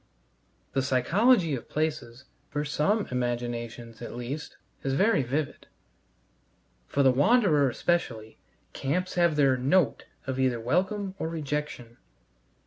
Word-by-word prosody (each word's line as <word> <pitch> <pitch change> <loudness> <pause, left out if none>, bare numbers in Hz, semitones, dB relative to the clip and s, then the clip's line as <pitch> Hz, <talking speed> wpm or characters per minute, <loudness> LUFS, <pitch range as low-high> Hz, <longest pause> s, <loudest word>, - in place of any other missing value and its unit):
The 135 - +2
psychology 165 - +3
of 130 - -5
places, 140 -5 -3 0.2
for 145 0 -2
some 195 +9 +1
imaginations 120 -2 -3
at 120 - -7
least, 125 +5 -6 0.2
is 135 0 -1
very 195 0 +3
vivid; 140 +4 -3 1.2
for 140 - +1
the 130 - +6
wanderer, 150 - +4
especially, 115 -8 -2 0.3
camps 180 +7 -2
have 170 -3 +3
their 135 -3 +4
"note" 135 +1 +2 0.2
either 130 -2 +1
of 115 - -9
welcome 190 - 0
or 160 - -2
rejection. 150 -6 -4
140 Hz, 120 wpm, -27 LUFS, 125-165 Hz, 1.2 s, the